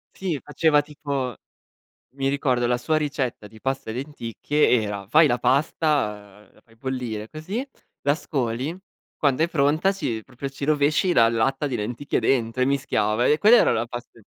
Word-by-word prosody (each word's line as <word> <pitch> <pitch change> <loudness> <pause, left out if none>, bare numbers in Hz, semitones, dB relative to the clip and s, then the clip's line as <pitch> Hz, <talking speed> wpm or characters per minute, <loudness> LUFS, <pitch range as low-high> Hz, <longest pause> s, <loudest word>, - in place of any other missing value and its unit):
Sì, 180 -7 -2
faceva 150 0 +3
tipo 140 -4 -4 0.8
mi 135 -1 0
ricordo 130 -3 +1
la 120 0 +1
sua 155 +6 0
ricetta 140 -8 -2
di 110 +1 -16
pasta 135 0 -3
e - - -3
lenticchie 130 0 0
era 100 -2 -4
fai 155 +5 +6
la 120 -2 +1
pasta, 110 - 0
ehm, - - -29
la - - -23
fai 115 - -24
bollire 120 -4 -4
così, 195 - -5 0.3
la 145 +1 +2
scoli, 135 0 -2 0.4
quando 145 +1 +2
è 170 - +1
pronta 155 +5 +2
ci 120 - -3
proprio 130 +3 -7
ci 135 +1 -9
rovesci 150 +4 +2
la 115 -9 +5
latta 135 +5 0
di 130 - -3
lenticchie 120 +6 -2
dentro 120 -1 +1
e - - +4
mischiava 120 -4 +1
e 150 - +4
quella 225 +4 +7
era - - +4
la 115 - 0
paste 120 -1 -9
135 Hz, 175 wpm, -24 LUFS, 115-150 Hz, 0.8 s, quella